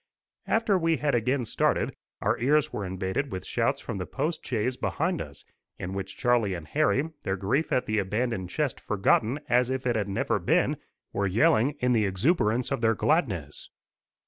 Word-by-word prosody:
After 220 -4 +2
we 165 -1 +2
had 145 -1 0
again 125 +2 +1
started, - - +1 0.3
our - - +1
ears 145 +5 +2
were 105 - -3
invaded 95 +8 -2
with 95 - -5
shouts - - 0
from 95 - -5
the 90 - -4
post 155 +4 -2
chaise 125 +1 -1
behind 165 +6 -1
us, 70 -1 -9 0.3
in 90 +1 -5
which 95 0 -5
Charlie 120 -6 +2
and 80 -3 -8
Harry, 155 - +1
their 95 - -1
grief 120 - 0
at 125 - +2
the 110 0 0
abandoned 105 -1 -1
chest 145 +3 -1
forgotten 110 +6 +2
as 125 +1 +3
if 130 0 -2
it 120 -2 +1
had 105 -2 -1
never 95 - 0
been, - - +2 0.4
were 100 0 0
yelling 115 +7 +3
in 125 0 +3
the 110 -3 +3
exuberance 115 - +1
of - - -1
their 115 -1 +3
gladness. 100 - -1
120 Hz, 180 wpm, -27 LUFS, 100-140 Hz, 0.4 s, as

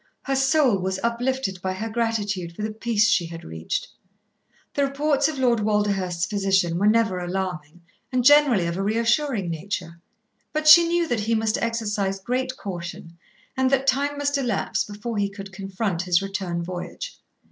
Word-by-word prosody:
Her 270 - -1
soul 270 -5 +3
was 190 +1 -2
uplifted 235 -4 -1
by 185 +1 -2
her 215 +4 -4
gratitude 205 -6 -2
for 210 - -5
the 215 - -2
peace 220 -1 +2
she 200 -7 +2
had 165 0 -9
reached. 80 0 -4 0.9
The 285 - +1
reports 280 +1 +1
of 315 -3 -4
Lord 245 -3 +2
Walderhurst's 200 -5 0
physician 195 -3 +1
were 205 - +3
never 215 -4 +3
alarming 175 -3 -4 0.3
and 255 -1 +1
generally 285 -10 +6
of 170 +1 -2
a - - -1
reassuring 230 - +1
nature. 170 0 -5 0.5
But 310 0 -1
she 335 +2 +9
knew 340 0 +1
that 240 -5 0
he 225 +2 0
must 220 0 0
exercise 210 -4 -1
great 255 +5 -2
caution, 170 -3 -7 0.4
and 260 0 +2
that 270 0 +2
time 285 +2 +1
must 285 0 0
elapse 240 -7 -1
before 210 +2 -5
he 200 0 +1
could 195 -1 -10
confront 195 -2 -3
his 180 -2 +2
return 190 -3 -3
voyage. 185 - -6
210 Hz, 170 wpm, -24 LUFS, 185-255 Hz, 0.9 s, she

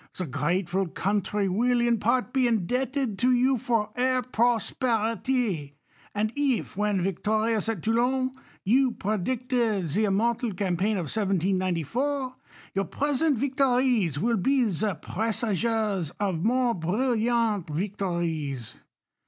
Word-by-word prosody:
The 185 - -1
grateful 180 +6 -1
country 200 +3 -1
AviU, 240 +5 +2
in 235 -2 +2
part, 245 +3 +1
be 260 -2 +3
indebted 245 +2 -1
to 250 +2 +3
you 255 +1 +3
for 225 -2 0
her 255 0 +1
prosperity; 230 - 0 0.4
and 215 +2 0
if, 280 -5 0
vvhen 205 -2 0
victorious 215 +4 0
?.i 225 - 0
Toulon, 245 +7 +1 0.3
you 250 +4 +3
predicted 220 -1 -1
the 210 +9 +1
immortal 225 +3 0
campaign 195 +2 0
of 180 - -1
1794, 195 - 0 0.4
your 195 0 0
present 290 - 0
victories 250 - +2
wili 230 +8 +1
be 270 +4 +3
the 195 +3 -1
presages 215 -1 -1
of 190 -5 -1
moi 245 +1 +2
e 225 - -4
brilliant 225 0 +1
victories. 165 - -3
220 Hz, 120 wpm, -26 LUFS, 190-250 Hz, 0.4 s, be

